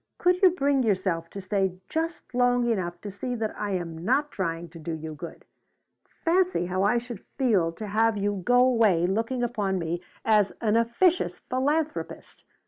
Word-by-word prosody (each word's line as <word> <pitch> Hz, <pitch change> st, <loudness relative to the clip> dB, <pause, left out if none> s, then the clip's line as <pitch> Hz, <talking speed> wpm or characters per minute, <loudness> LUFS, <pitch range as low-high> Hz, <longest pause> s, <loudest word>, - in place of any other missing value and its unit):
Could 360 Hz, 0 st, +2 dB
you 375 Hz, -, +8 dB
bring 285 Hz, -6 st, +1 dB
yourself 185 Hz, -7 st, 0 dB
to 200 Hz, -, -7 dB
stay 190 Hz, -1 st, -1 dB
just 325 Hz, -5 st, -4 dB
long 245 Hz, -1 st, +2 dB
enough 180 Hz, -6 st, -1 dB
to 205 Hz, -, -6 dB
see 245 Hz, +6 st, -4 dB
that 220 Hz, -2 st, -3 dB
I 205 Hz, -1 st, -3 dB
am 165 Hz, -3 st, -4 dB
not 280 Hz, +8 st, +1 dB
trying 170 Hz, -2 st, -3 dB
to 165 Hz, +1 st, -12 dB
do 160 Hz, +1 st, -5 dB
you 160 Hz, 0 st, -6 dB
good? 165 Hz, +3 st, -9 dB, 0.8 s
Fancy 360 Hz, -, +2 dB
how 185 Hz, +1 st, -1 dB
I 205 Hz, +5 st, +3 dB
should 235 Hz, -3 st, -6 dB
feel 210 Hz, -11 st, +2 dB
to 215 Hz, -, -7 dB
have 220 Hz, +1 st, +2 dB
you 200 Hz, -1 st, -1 dB
go 245 Hz, +3 st, +4 dB
away 225 Hz, -9 st, +4 dB
looking 225 Hz, +6 st, -1 dB
upon 205 Hz, -5 st, -1 dB
me 170 Hz, 0 st, -3 dB, 0.2 s
as 210 Hz, -2 st, +3 dB
an 220 Hz, -2 st, +1 dB
officious 235 Hz, +11 st, +2 dB
philanthropist! 295 Hz, +4 st, -2 dB
215 Hz, 175 wpm, -26 LUFS, 185-250 Hz, 0.8 s, you